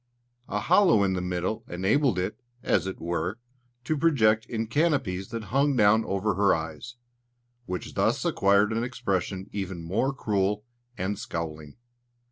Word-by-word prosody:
A - - -1
hollow 170 - +5
in 95 -1 +1
the 90 - -1
middle 90 +3 -2
enabled 100 +6 +1
it, 95 +7 -3 0.2
as 95 -1 +1
it 95 - -5
were, 85 +4 -2 0.5
to 155 +6 0
project 115 -8 +3
in 115 -1 -2
canopies 115 - 0
that 115 -1 -5
hung 140 +1 +3
down 110 0 +5
over 100 +2 0
her 100 +2 +3
eyes, 80 +9 -6 0.7
which 90 -1 -5
thus - - +1
acquired 100 +2 +3
an 115 +1 0
expression 95 -6 -2
even 95 -4 -4
more 100 +11 0
cruel 105 -5 -1 0.3
and 95 +2 -2
scowling. 80 -3 -5
100 Hz, 145 wpm, -27 LUFS, 90-115 Hz, 0.7 s, hollow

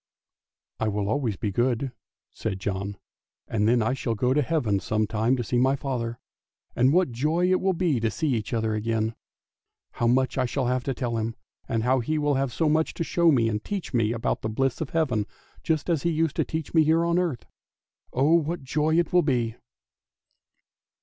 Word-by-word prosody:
" - - -68 0.3
I 110 - 0
will 105 -1 -1
always 110 -4 0
be 105 - -2
good! 125 +4 0 0.2
" - - -55
said 95 -4 -4
John, 100 +1 -3 0.3
" - - -68
and 105 -1 +1
then 120 0 +3
I 115 - +1
shall 120 -3 -2
go 125 +4 +1
to 150 - +3
Heaven 125 -9 0
some 110 +2 0
time 110 +4 +1
to 120 0 -1
my 135 +2 +3
father, 120 -4 -3 0.6
and 130 +2 +4
what 180 -4 +3
joy 160 +9 +1
it 185 - +2
will 190 0 +2
be 165 -7 +1
to 115 0 +1
see 155 - -2
each 115 -6 -1
other 110 -2 0
again. 110 +1 -1 0.8
How 120 - -1
much 130 +2 +2
I 130 - +2
shall 130 +1 -1
have 125 0 0
to 135 - -1
tell 120 -3 -2
him; 115 +1 -3 0.3
and 115 -1 0 0.2
he 155 +3 0
will 145 -1 +1
have 135 -1 0
so 160 - 0
much 160 +1 +1
to - - -1
show 170 +1 +3
me, 120 -6 +3
and 105 -1 -2
to - - -15
teach 200 -7 -4
me 115 -3 +2
about 115 -1 -1
the 110 - -2
bliss 135 +5 -1
of 155 - -3
Heaven, 130 -11 0 0.3
just 155 -3 -1
as 165 -5 +1
he 170 - +1
used 160 -2 0
to - - +3
teach 160 -2 -5
me 160 -2 +6
here 160 +2 +3
on 170 +1 +2
earth. 165 -10 -2 0.7
Oh, 140 +6 +3
what 170 -1 +1
joy 155 +4 +1
it 170 -1 +1
will 180 - +6
be! 120 -7 0
130 Hz, 215 wpm, -26 LUFS, 115-155 Hz, 0.8 s, me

